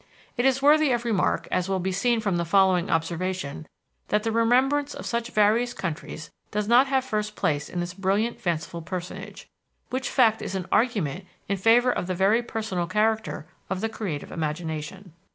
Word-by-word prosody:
It 245 - 0
is 270 0 +2
worthy 300 0 +5
of 240 0 -1
remark, 210 -6 +1
as 185 +1 0
will 190 - +1
be 190 +1 -2
seen 230 +5 +1
from 200 -5 0
the 170 - 0
following 185 0 +3
observation, 165 -2 -2 0.4
that 210 0 +1
the 225 - 0
remembrance 260 +6 +2
of - - -7
such 235 0 -2
various 225 +3 +2
countries 160 -2 -5 0.2
does 210 0 -2
not 245 +4 +5
have 265 -1 +1
first 210 -3 -2
place 145 0 -1
in 175 - -3
this 175 +1 -4
brilliant, 200 +5 0
fanciful 170 -3 -2
personage 185 +4 -7 0.4
which 260 0 -2
fact 225 -4 +3
is 195 - -4
an 185 -2 -3
argument 200 - +1 0.2
in 200 - 0
favor 235 +5 +4
of 180 - -3
the 185 - -2
very 200 +6 +3
personal 215 -7 -3
character 215 -2 0 0.2
of 190 0 -2
the 225 - -1
creative 190 -10 -5
imagination. 160 +3 -4
200 Hz, 180 wpm, -25 LUFS, 180-235 Hz, 0.4 s, worthy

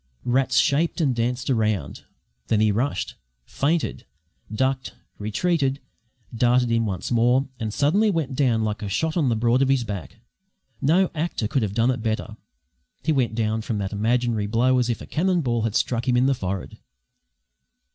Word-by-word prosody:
Rats 130 +2 +1
shaped 160 +4 +2
and 145 -6 +2
danced 120 +2 -1
round; 110 -5 -1 0.4
then 110 - +2
he 110 -1 +3
rushed, 110 -2 -1 0.3
feinted, 155 +3 -1 0.4
ducked, 130 +3 -1 0.2
retreated, 135 - 0 0.6
darted 120 +1 +3
in 115 -1 +1
once 95 +3 -4
more, 125 +3 +3
and 110 -1 -3
suddenly 165 - +2
went 160 -8 -1
down 125 -5 +2
like 105 0 -2
a 105 - -4
shot 160 +11 -1
on 155 -7 +2
the 115 - +1
broad 120 +3 +2
of 135 - +2
his 135 -3 +2
back. 100 -1 -6 0.6
No 175 +7 +3
actor 155 -8 -2
could 135 +2 0
have 100 -2 -2
done 115 +2 +3
it 125 -2 -3
better; 110 -1 -3 0.7
he 160 - +1
went 125 -6 +1
down 110 -1 0
from 110 0 -3
that 100 0 -3
imaginary 115 0 0
blow 125 +4 +2
as 120 -1 0
if 115 - -2
a - - -7
cannon 180 +2 +1
ball 120 -5 0
had 110 -1 -2
struck 120 0 0
him 125 -1 +3
in 125 - +3
the 135 - +3
forehead. 95 -5 -5
120 Hz, 175 wpm, -24 LUFS, 110-135 Hz, 0.7 s, he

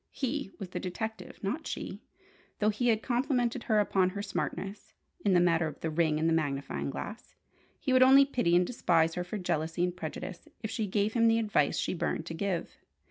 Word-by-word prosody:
He 275 -2 -3
was 195 -4 -6
the - - -4
detective, 220 +4 -5
not 270 +12 -2
she - - -5 0.6
though 210 - +2
he 245 +4 -1
had 220 -2 +2
complimented 245 -1 0
her 215 -2 +3
upon 190 -2 +2
her 200 +2 -5
"smartness" 200 0 -4 0.3
in 195 -3 +3
the - - +6
matter 170 -2 +3
of 150 - -8
the 160 - -2
ring 155 -1 +2
and 160 - +2
the 165 - +3
magnifying 140 -4 -1
glass. 210 - -7 0.4
He 260 - 0
would 255 - +6
only 270 +2 +8
pity 245 -11 +1
and 180 +1 +5
despise 165 -7 +2
her 180 - -2
for 180 +4 -5
jealousy 165 -2 -1
and 180 0 0
prejudice 175 +1 -6 0.2
if 220 - -3
she 220 -3 -1
gave 205 +2 0
him 230 -1 +4
the 225 0 +4
advice 210 -10 +1
she - - -1
burned 165 -2 -2
to 165 - -5
give. 180 +1 -3
195 Hz, 205 wpm, -30 LUFS, 170-230 Hz, 0.6 s, only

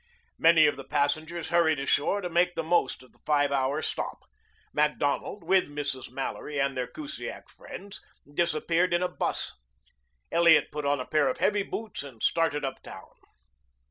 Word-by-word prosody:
Many 165 -1 +6
of 145 - +2
the 135 - -7
passengers 155 +4 -1
hurried 165 -2 +3
ashore 145 +8 +1
to 180 - -3
make 175 +1 +2
the 165 - -1
most 170 -5 +1
of 130 - -19
the - - -29
five 145 -2 +2
hour 140 +3 0
stop. - - -3 0.5
Macdonald, 150 +5 0
with 185 +2 +3
Mrs. 145 -3 -4
Mallory 135 +3 -4
and 140 0 +1
their 125 -1 -2
Kusiak 305 -1 -7
friends, 205 - -10 0.3
disappeared 170 +2 +1
in 175 - +1
a - - +2
bus. - - -2 0.7
Elliot 165 -3 +5
put 150 -1 -4
on 145 -1 +2
a 125 - -4
pair 155 - +2
of 260 - -1
heavy 205 -1 +2
boots 220 +2 -5
and 130 -6 -10
started 150 -3 +1
uptown. 95 -7 -8
155 Hz, 165 wpm, -28 LUFS, 140-175 Hz, 0.7 s, Many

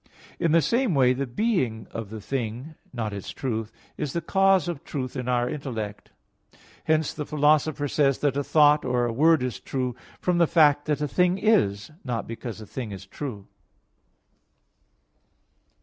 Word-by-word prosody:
In 165 - +2
the 165 0 +4
same 235 - +1
way, 130 -2 +5
the 135 +1 -3
being 125 - 0
of 115 -3 -6
the 110 0 -7
thing, 125 +5 -4 0.2
not 110 -4 -3
its 100 -2 -6
truth, 115 -4 -3 0.3
is 140 - -3
the 170 - 0
cause 190 0 +3
of 170 -3 -4
truth 130 -6 -5
in 125 -1 -4
the 125 0 +1
intellect. 115 -8 -5 0.8
Hence 155 -1 +1
the 150 - -4
Philosopher 150 0 +2
says 140 -1 +2
that 145 -2 0
a 145 - 0
thought 150 0 +4
or 120 -1 +1
a 120 - -2
word 155 +2 +4
is 125 -2 -3
true 125 -3 -3 0.2
"from 180 -1 +1
the 170 - +5
fact 145 -3 +4
that 150 -1 -1
a 150 - 0
thing 180 +5 +2
is, 170 - +2
not 120 -4 -3
because 115 -1 -6
a 110 - -9
thing 115 +1 -6
is 95 0 -8
true." 105 -2 -7
135 Hz, 170 wpm, -25 LUFS, 120-155 Hz, 0.8 s, way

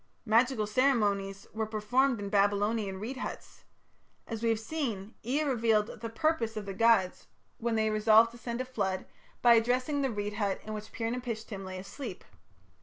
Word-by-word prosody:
Magical 230 0 +3
ceremonies 205 -5 +1
were 220 0 -2
performed 230 +4 +1
in 200 -1 -4
Babylonian 205 0 +1
reed 240 +6 -5
huts. - - -7 0.6
As 225 -2 -5
we 230 - +1
have 225 -1 +1
seen, 225 -6 -4
Ea 270 +7 0
revealed 225 -5 +1
the 230 - -4
"purpose" 230 -3 0
of 210 - -4
the 195 - -5
gods, 200 -3 +3 0.3
when 235 0 0
they 220 0 +2
resolved 220 +2 +5
to 240 - -13
send 235 0 -4
a - - -3
flood, 195 -7 -2 0.4
by 240 -1 +8
addressing 250 +5 +2
the 270 - +1
reed 205 -2 -3
hut 205 -2 -1
in 215 - -6
which 215 0 -7
Pir 225 0 -2
napishtim 230 -5 -5
lay 185 0 -6
asleep. 195 +9 -7
225 Hz, 175 wpm, -30 LUFS, 205-240 Hz, 0.6 s, by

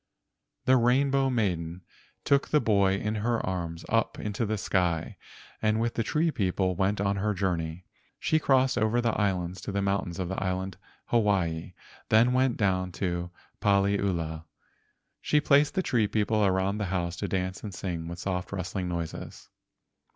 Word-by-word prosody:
The 130 0 +5
Rainbow 135 +3 +3
Maiden 90 -7 -1 0.4
took 140 -1 +3
the 150 - +3
boy 100 -6 +3
in 105 +2 -2
her 115 +1 +1
arms 85 -3 -4
up 115 0 +1
into 105 +2 -2
the 110 +1 -1
sky, 90 -5 0 0.5
and 110 0 +2
with 115 +1 0
the - - -1
tree 155 +8 +1
people 95 -5 0
went 95 +2 +1
on 100 0 +1
her 105 +1 0
journey. 90 -2 -2 0.3
She 155 - +2
crossed 130 -4 +3
over 110 +2 +2
the 120 -1 +2
islands 95 -4 -1
to - - -5
the 100 - -1
mountains 100 -3 -1
of 90 - -2
the 95 +1 -3
island 95 -1 -2 0.3
Hawaii, 95 -7 +1 0.4
then 115 +3 +5
went 130 -1 +2
down 95 -3 +1
to 85 -2 -2 0.3
find 100 -1 +4
Paliula. 85 -6 -1 0.8
She 150 - +3
placed 145 +1 +3
the 190 - +1
tree 115 -9 +2
people 105 +1 +1
around 95 +1 +1
the 105 - -1
house 90 -2 -2
to 100 - -2
dance 95 0 -2
and 105 - -5
sing 85 -4 -4
with 85 0 -6
soft 90 0 -3
rustling 95 -1 -3
noises. 85 -2 -6
100 Hz, 165 wpm, -28 LUFS, 90-115 Hz, 0.8 s, The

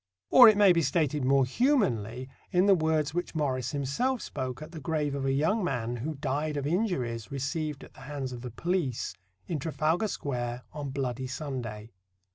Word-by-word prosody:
Or 245 -3 +10
it 215 - +3
may 200 -3 +7
be 170 - +2
stated 150 -3 +1
more 135 +1 +4
humanly 130 - +1 0.2
in 180 +1 +4
the 200 - +6
words 155 -3 +1
which 175 0 -3
Morris 130 -5 0
himself 150 - -1
spoke 130 -3 -4
at 155 - -10
the 165 - -7
grave 150 -2 -1
of 140 -1 -2
a 135 - +2
young 160 +11 +1
man 120 -7 -2
who 150 +7 -4
died 145 +2 -2
of 140 - -2
injuries 140 - -1
received 145 +2 -3
at - - -14
the - - -16
hands 140 -3 -4
of 120 - -7
the 125 - -5
police 160 - -2 0.3
in 165 -4 -3
Trafalgar 160 +6 0
Square 125 -8 -3
on 145 -2 -5
"Bloody 130 -1 -3
Sunday." 125 -6 -5
145 Hz, 185 wpm, -29 LUFS, 130-165 Hz, 0.3 s, Or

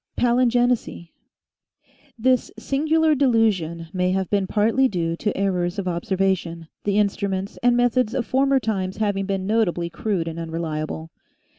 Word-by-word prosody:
PALINGENESY 245 -6 +1 1.1
HIS 255 -1 +2
singular 315 +3 +2
delusion 215 - +1
may 180 -1 +1
have 190 -1 -2
been 200 -2 +1
partly 225 +7 +2
due 170 -6 -2
to 210 - -2
errors 180 -2 0
of 195 -2 -3
observation, 180 -2 -1 0.2
the 205 0 +1
instruments 200 -1 -1
and 245 0 +3
methods 245 -1 +2
of 255 -3 -1
former 270 +1 +2
times 195 -5 -2
having 200 -3 -1
been 195 -1 -2
notably 185 -5 0
crude 185 -4 -2
and 165 0 -5
unreliable. 160 -1 -4
200 Hz, 135 wpm, -23 LUFS, 175-240 Hz, 1.1 s, and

